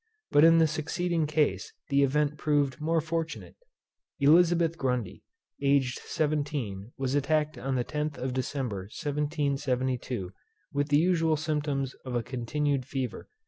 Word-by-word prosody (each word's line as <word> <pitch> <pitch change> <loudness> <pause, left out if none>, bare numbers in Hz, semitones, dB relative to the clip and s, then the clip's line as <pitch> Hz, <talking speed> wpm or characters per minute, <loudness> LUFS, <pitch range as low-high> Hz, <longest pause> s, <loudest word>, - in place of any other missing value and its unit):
But 145 - +6
in 165 0 +7
the 165 - +6
succeeding 160 +1 -1
case 150 -1 0 0.2
the 140 0 +3
event 145 +2 +2
proved 145 -2 0
more 165 +1 +1
fortunate. 165 +1 -4 0.6
Elizabeth 165 +3 +4
Grundy, 125 - -2 0.4
aged 140 -2 +2
seventeen, 145 -9 -2
was 135 -1 -1
attacked 150 +2 +1
on 135 0 -2
the 125 -1 0
10th 150 0 -3
of 130 0 -3
December 125 -7 -3
1772, 140 - -1 0.4
with 145 0 0
the 145 - +5
usual 165 -1 +2
symptoms 145 -3 -1
of 130 -2 -4
a 120 - 0
continued 135 +3 -1
fever. 130 -3 -4
145 Hz, 135 wpm, -28 LUFS, 130-155 Hz, 0.6 s, in